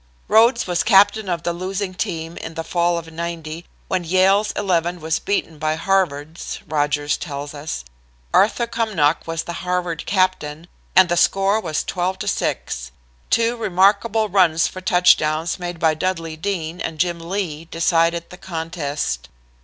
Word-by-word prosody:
"Rhodes 235 +2 +5
was 175 -1 0
captain 205 0 +4
of 170 -2 -2
the 175 - -1
losing 185 +2 -3
team 165 -4 -4
in 165 - -7
the 165 - -3
fall 175 0 +1
of 165 -1 -7
'90, 165 0 -5 0.2
when 185 -2 -1
Yale's 190 +4 +3
Eleven 175 -2 0
was 160 0 -1
beaten 165 -6 -2
by 155 0 0
Harvard's," 165 -3 -1
Rodgers 145 -1 0
tells 145 -2 -6
us. 150 +2 -5 0.5
"Arthur 225 +4 +4
Cumnock 205 -12 0
was 165 0 -2
the 170 - -6
Harvard 180 -3 -2
captain, 175 -5 0 0.3
and 185 0 +7
the 175 - +1
score 195 +4 +3
was 160 -5 -2
12 185 +1 -2
to - - -5
6. 65 +1 -2 0.4
Two 230 +1 +2
remarkable 215 +1 +2
runs 175 -5 +3
for 185 - -8
touchdowns 175 -4 +3
made 175 -1 -5
by 160 -1 +3
Dudley 165 -1 -2
Dean 170 -1 -3
and 160 -1 -4
Jim 170 +1 0
Lee 165 -3 -4
decided 165 0 +1
the 180 - -10
contest. 160 - -3
175 Hz, 155 wpm, -21 LUFS, 160-190 Hz, 0.5 s, and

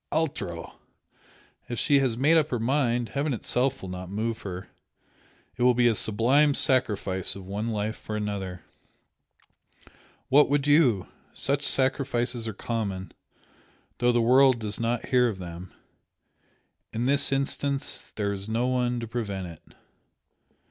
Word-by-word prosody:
"Altro! 135 - -3 0.9
If 120 - -3
she 145 -5 +3
has 130 -4 0
made 145 +6 +4
up 155 -2 +3
her 125 - -1
mind, 120 -1 0
heaven 140 +1 -1
itself 130 +3 -1
will 95 - -6
not 90 0 -7
move 110 +3 -3
her! 95 -1 -7 0.9
It - - -6
will 125 0 +5
be 120 0 +4
a 115 - +4
sublime 120 +9 +3
sacrifice 105 - +2
of 95 -1 -9
one 105 +4 -3
life 110 0 -2
for 110 - -6
another, 100 -4 -4 1.6
what 145 +3 +5
would 140 -1 +1
you? 145 - +4 0.3
Such 140 +1 +1
sacrifices 130 -3 0
are 110 - -4
common, 100 -7 -4 0.9
though 120 0 +3
the 120 -1 +2
world 130 +1 +5
does 110 -2 -2
not 115 0 -2
hear 125 -1 +4
of 105 - -5
them. 90 0 -8 1.2
In 115 +2 -2
this 140 +1 +4
instance 140 0 -1
there 100 -1 -1
is 100 +1 -5
no 115 +2 0
one 125 -1 0
to 115 - -5
prevent 105 -5 -4
it." 80 -2 -15
120 Hz, 145 wpm, -26 LUFS, 105-135 Hz, 1.6 s, will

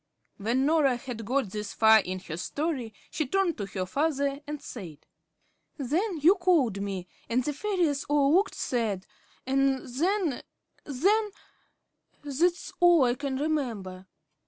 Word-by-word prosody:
When 235 +6 0
Norah 295 -4 +3
had 240 -3 -7
got 255 -4 0
this 210 -1 -5
far 220 0 +7
in 185 -2 -3
her 165 -3 -6
story, 265 - -3 0.2
she 310 - -2
turned 380 +1 +1
to 200 - -3
her 190 -2 -3
father, 280 - 0
and 300 0 -4
said: 185 - -9 0.7
"Then 330 - -1
you 340 +6 +7
called 330 - +2
me, 195 -3 -4 0.2
and 245 +2 +1
the 295 - -2
fairies 335 -4 0
all 290 0 +3
looked 385 +4 +3
sad, 215 -7 -1 0.4
and 270 0 +1
then 325 +3 0 0.4
then 400 - +2 0.9
that's 330 +5 0
all 350 -4 +6
I 240 -1 +3
can 270 0 -3
remember." 230 -12 -3
275 Hz, 140 wpm, -28 LUFS, 220-315 Hz, 0.9 s, far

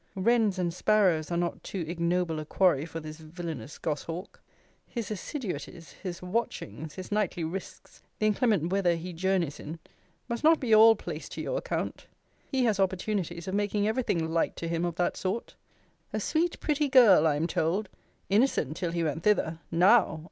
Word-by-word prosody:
Wrens 215 0 +2
and 175 -2 -1
sparrows 180 -5 +2
are 170 - -1
not 175 0 -2
too 185 -4 -4
ignoble 170 -1 0
a 155 - -5
quarry 165 -3 +2
for 165 - -6
this 155 0 -9
villainous 160 -4 -7
gos 150 -3 -2
hawk! 170 +4 -7 0.5
His 230 -4 -5
assiduities; 185 - -5
his 180 -3 -7
watchings; 160 - -3
his 185 +1 -8
nightly 205 -4 0
risques; 175 +4 -7 0.2
the 215 - 0
inclement 210 -5 +2
weather 185 -3 +2
he 175 +2 -6
journeys 175 -3 0
in; 160 +3 -7 0.5
must 235 +2 -4
not 320 +1 +6
be 235 -4 +1
all 225 +1 +8
placed 165 -6 -7
to - - -5
your - - -1
account. - - -4 0.4
He 265 -2 +2
has 215 -4 +1
opportunities 185 -2 -1
of 190 - -3
making 205 0 +1
every 220 +4 +1
thing 170 -9 0
light 165 0 0
to 165 - -5
him 170 +1 -1
of 170 -2 -3
that 175 - 0
sort. 195 +5 -3 0.6
A - - 0
sweet 335 +2 0
pretty 295 -1 0
girl, 215 - +7
I 150 - +2
am 150 +3 0
told 175 +5 0 0.4
innocent 195 - +2
till 170 -2 -2
he 170 -1 0
went 155 0 -2
thither 165 -5 +1
Now! 185 +1 +4
180 Hz, 180 wpm, -28 LUFS, 165-215 Hz, 0.6 s, all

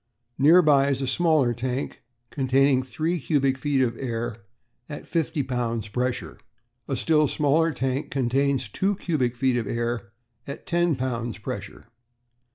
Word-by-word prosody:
Near 165 +6 +7
by 140 -2 +4
is 135 -1 -1
a - - 0
smaller 155 -4 +2
tank, 125 +3 -4 0.3
containing 135 -1 +3
three 155 +8 -2
cubic 135 -2 +1
feet 135 0 +1
of 120 -2 -1
air 115 -4 -4 0.4
at 145 - -7
a - - -18
fifty 155 -3 -1
pounds 115 -4 -2
pressure. 125 +3 -3 0.5
A - - -1
still 155 -2 +3
smaller 155 +4 +2
tank 135 +1 -2
contains 135 0 0
two 195 - 0
cubic 135 -10 -1
feet 125 0 +1
of 115 -4 -2
air 115 -3 -3 0.4
at 140 - -6
a - - -33
ten 175 -2 +1
pounds 120 -2 -3
pressure. 100 -2 -7
130 Hz, 155 wpm, -25 LUFS, 120-150 Hz, 0.5 s, Near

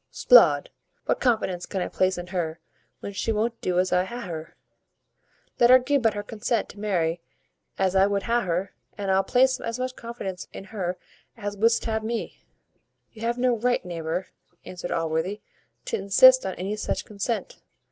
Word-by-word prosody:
"'Sblood! - - +5 0.3
what - - 0
confidence 215 -8 0
can 195 - -3
I 180 - -1
place 185 0 0
in 175 - -5
her, 175 -3 -3 0.4
when 200 - -6
she 195 +3 -1
won't 225 +2 -1
do 180 -1 -1
as 185 +1 +2
I 180 - +4
would 185 - -5
ha' 240 0 -6
her? 160 -2 -7 1.0
Let 240 - +6
her 255 - +10
gi' 275 +3 +1
but 225 -4 +1
her 205 - -3
consent 220 +1 -2
to 205 - -12
marry 175 -5 0 0.6
as 190 -1 +1
I 190 +1 +5
would 200 -1 -1
ha' 240 +1 +1
her, 180 +3 -1 0.2
and 200 -2 -1
I'll 190 0 +4
place 260 +4 +3
as 230 +1 -4
much 255 0 -3
confidence 195 -6 -6
in - - -8
her 185 -3 -4 0.4
as 205 -2 -4
wouldst 230 +3 +2
ha' 220 -1 -1
me." 230 +1 -4 0.7
"You 220 - -14
have 235 +1 -1
no 250 -1 +2
right, 245 -2 0
neighbour," 170 +1 -4 0.4
answered 180 -1 -7
Allworthy, 165 +5 -1 0.4
"to - - -1
insist 255 +5 +6
on 190 - -4
any 195 +3 -3
such - - -3
consent. 230 - -4
205 Hz, 185 wpm, -25 LUFS, 185-235 Hz, 1.0 s, her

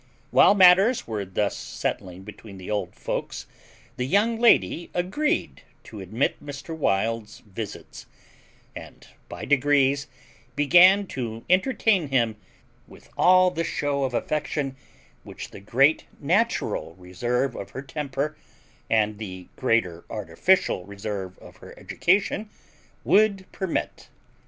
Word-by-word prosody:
While 205 - +6
matters 195 +5 +5
were 105 -3 -4
thus 95 +2 -1
settling 90 0 -5
between 105 0 -12
the 95 +3 -8
old 100 -4 -3
folks - - -5 0.5
the 125 - -2
young 220 - +2
lady 230 -7 +3
agreed 190 +13 -1 0.2
to 110 - -11
admit 110 +8 -2
Mr. 145 +3 -7
Wild's 110 -4 -1
visits, 105 0 -9 0.7
and, - - -11 0.2
by - - -7
degrees, 140 0 +2 0.5
began 180 +7 +6
to 115 -3 -5
entertain 195 - +2
him 120 -5 0 0.5
with - - -17
all 185 0 +5
the 165 -1 -2
shew 145 -3 -2
of 130 -2 -1
affection 145 -1 -2 0.5
which - - -10
the - - -10
great 135 +9 +2
natural 175 - 0
reserve 120 +8 -2
of 100 - -7
her 130 - -7
temper, 140 +1 -4 0.5
and 105 -1 +1
the 95 -4 -8
greater 115 -9 0
artificial 115 - +1
reserve 100 -1 -6
of - - -15
her - - -14
education, 200 +3 0 0.6
would 200 -2 +3
permit. 190 -4 -4
135 Hz, 120 wpm, -25 LUFS, -, 0.7 s, While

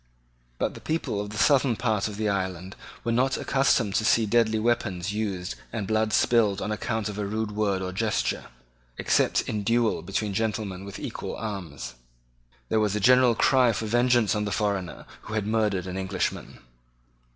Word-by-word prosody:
But - - -1
the - - -11
people 155 -10 -2
of 105 - -6
the 105 - -7
southern 135 -3 +4
part 110 -3 0
of 105 -2 -7
the 110 0 -1
island 95 -2 -2 0.3
were 115 - -1
not 130 +3 +2
accustomed 125 -6 +2
to 110 - +1
see 115 0 +3
deadly 110 0 +2
weapons 105 -5 0
used 100 -4 -3 0.2
and 110 -3 -3
blood 110 +1 +1
spilled 110 -3 +3
on 105 - -3
account 110 +1 -2
of 105 0 -5
a 105 - -1
rude 110 +1 -2
word 100 -3 0
or 95 - -3
gesture, 105 +2 -1 0.5
except - - +2
in 105 - -3
duel 115 +2 +1
between 100 +2 -2
gentlemen 100 -3 -2
with 100 - -8
equal - - -5
arms. 90 - -6 0.8
There 110 - +2
was 105 -1 +1
a - - 0
general 125 +2 +5
cry 125 -1 +4
for 110 - -3
vengeance 120 0 +3
on 105 -1 -1
the 100 - -3
foreigner 100 -4 -2 0.2
who 110 - -6
had 105 -2 -1
murdered 105 -4 0
an 90 0 -5
Englishman. 95 -1 -3
105 Hz, 180 wpm, -26 LUFS, 100-115 Hz, 0.8 s, general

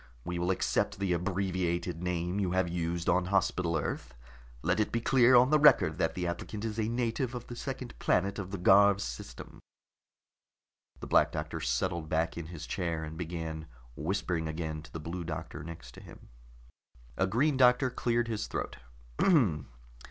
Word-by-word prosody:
We 90 0 -3
will 90 +1 0
accept 95 - 0
the 95 -2 0
abbreviated 90 -2 -1
name 90 +1 -1
you 95 -3 0
have 95 -1 +2
used 85 0 -2
on 90 +1 +3
Hospital 90 -3 +1
Earth. - - -4 0.5
Let 90 +5 +1
it 105 - +1
be 115 - 0
clear 125 +1 +5
on 125 +3 +6
the 155 - +5
record 90 - +5
that 80 - 0
the 90 - -2
applicant 100 +5 -4
is 110 0 -3
a 110 0 0
native 120 +1 -1
of 120 - -6
the 120 - -8
second 130 -1 -5
planet 100 +2 +1
of 95 -2 -5
the 100 - -4
Garv 100 +2 +6
system." - - -7 1.4
The - - -5
Black - - +4
Doctor 80 +1 -4
settled 80 +5 -1
back 80 +1 0
in 85 -2 -6
his 80 -3 -8
chair 85 -2 -2
and 80 0 -6
began 80 -2 -5 0.3
whispering 85 -1 -2
again 80 -1 -4
to 75 - -14
the 80 - -6
Blue 85 +3 -5
Doctor 80 -3 -6
next 80 -6 -9
to - - -13
him. - - -14 0.9
A 90 - +1
Green 135 +9 +2
Doctor 125 0 +4
cleared 120 -1 0
his 110 -2 -3
throat. - - -4
90 Hz, 175 wpm, -30 LUFS, 80-105 Hz, 1.4 s, on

